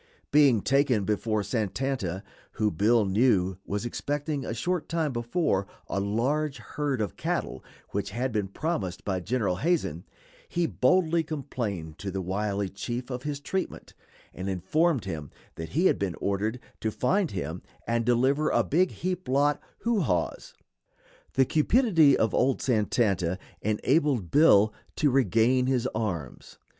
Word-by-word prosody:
Being 140 -8 +5
taken 135 -7 +2
before 105 0 0
Santanta, 105 -2 -2 0.3
who 105 -1 +1
Bill 105 +5 +3
knew 95 -3 +2
was 105 +3 -2
expecting, 145 +3 -2
a - - -4
short 165 +6 -2
time 160 -4 0
before, 120 - 0 0.2
a 100 - -1
large 135 +9 0
herd 135 +1 -3
of 105 - -3
cattle - - -3 0.3
which 100 0 -2
had 125 +5 -2
been 105 -3 -1
promised 100 - -3
by 95 -2 -1
General 105 -2 -1
Hazen, 150 - 0 0.5
he 175 0 0
boldly 165 +3 +2
complained 120 - -4
to 100 - -4
the 95 0 -3
wily 100 +2 -1
chief 120 +6 -5
of 125 0 -4
his 145 0 -4
treatment, 190 +6 -4 0.4
and 95 +1 -4
informed 130 - +1
him 80 -7 -5 0.2
that 80 0 -7
he 165 +7 +1
had - - +4
been 95 -4 -2
ordered 105 +5 -1 0.2
to 110 - -1
find 175 - +1
him 85 -2 -4 0.2
and 115 0 0
deliver 130 +6 +2
"a - - +3
big 180 +5 +2
heap 185 -3 -4
lot 145 +2 +2 0.2
who 230 -2 +1
haws." 90 - -2 0.8
The 135 - +4
cupidity 160 - +4
of 110 - +1
old 130 +1 +2
Santanta 105 -6 +1 0.2
enabled 125 - +1
Bill 110 -9 +6 0.2
to 145 -3 +2
regain 125 +1 +3
his 130 -3 +1
arms. 90 - -4
120 Hz, 145 wpm, -27 LUFS, 100-145 Hz, 0.8 s, Bill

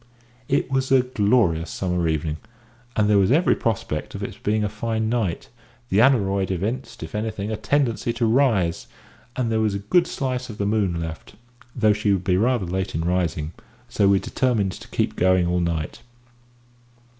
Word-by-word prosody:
It 140 0 0
was 135 0 0
a 130 -2 +5
glorious 105 -8 +1
summer 90 -2 -1
evening, 80 -1 -1 0.6
and 105 -1 +2
there 105 -1 +4
was 100 +3 +3
every 165 +6 +4
prospect 100 -9 -3
of - - -5
its - - -5
being 105 +1 -1
a - - +1
fine 110 +1 -2
night; 110 -8 -2 0.4
the 95 - +2
aneroid 100 -7 +3
evinced, 105 +5 -3
if 80 - -8
anything, 105 -1 -3
a - - -1
tendency 120 -2 0
to 120 - 0
rise, 110 -9 +2 0.5
and 120 -3 -1
there 110 - +1
was 105 -2 +1
a 100 +1 -6
good 175 -1 +5
slice 130 -3 -3
of 105 - -8
the 100 - -1
moon 100 -5 0
left, 80 -1 -7 0.4
though 110 -3 +4
she 105 0 0
would 95 -2 -1
be 90 0 +2
rather 115 +1 +1
late 95 +2 -3
in 80 - 0
rising, 85 -3 -1 0.4
so 100 - +2
we 100 0 +5
determined 110 -2 0
to - - -10
keep - - -1
going 95 0 +3
all 90 +1 +1
night. 85 +4 -2
105 Hz, 180 wpm, -23 LUFS, 90-115 Hz, 0.6 s, a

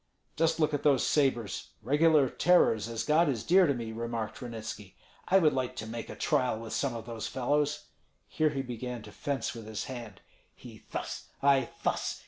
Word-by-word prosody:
"Just 165 0 +1
look 155 -1 +2
at 145 - 0
those 140 -4 +3
sabres, 130 -7 0
regular 150 +3 +4
tearers, 115 - +3
as 115 -1 -3
God 155 +1 +3
is 120 -6 -1
dear 185 +1 +5
to 140 - +2
me!" 115 -2 -5
remarked 115 -1 -4
Ranitski. 110 -4 -7 0.3
"I 190 - +5
would 155 -5 +4
like 130 -1 -2
to 110 - -5
make 115 +1 -6
a - - -7
trial 125 -4 +1
with 115 -1 -7
some 135 -4 -1
of 115 -1 -6
those 115 -2 -5
fellows." 145 +3 0 0.4
Here 155 0 +1
he 135 -2 -3
began 125 -1 -5
to 105 - -11
fence 140 +5 -3
with 115 -2 -9
his 110 -1 -4
hand: 120 -4 -8 0.3
"He - - -13
thus, - - -5 0.2
I 140 -3 +4
thus! - - -1
125 Hz, 190 wpm, -30 LUFS, 115-145 Hz, 0.4 s, dear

